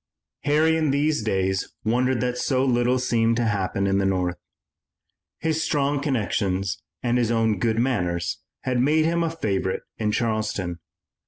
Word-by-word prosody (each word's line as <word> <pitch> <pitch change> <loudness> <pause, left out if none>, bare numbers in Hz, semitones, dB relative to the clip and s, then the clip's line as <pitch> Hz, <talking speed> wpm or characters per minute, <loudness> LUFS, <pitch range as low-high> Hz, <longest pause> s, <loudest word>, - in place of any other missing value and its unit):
Harry 155 +2 +3
in 155 -2 +1
these 145 0 +1
days 95 -2 -1
wondered 125 +3 +1
that 125 -1 0
so 130 +1 +1
little 125 0 +2
seemed 115 -2 +2
to 120 0 0
happen 100 -2 0
in 100 0 +2
the - - +1
North. 90 -2 0 1.0
His 160 -1 -1
strong 145 -2 +1
connections 100 -8 -1 0.2
and 120 0 +2
his 120 -2 +1
own 110 -3 +1
good 110 +1 +1
manners 90 -9 0 0.2
had 125 -1 0
made 155 +4 +3
him 170 +1 +1
a 165 - +1
favorite 100 -12 -2 0.2
in 105 -1 +1
Charleston. 105 -6 -1
115 Hz, 155 wpm, -24 LUFS, 100-135 Hz, 1.0 s, Harry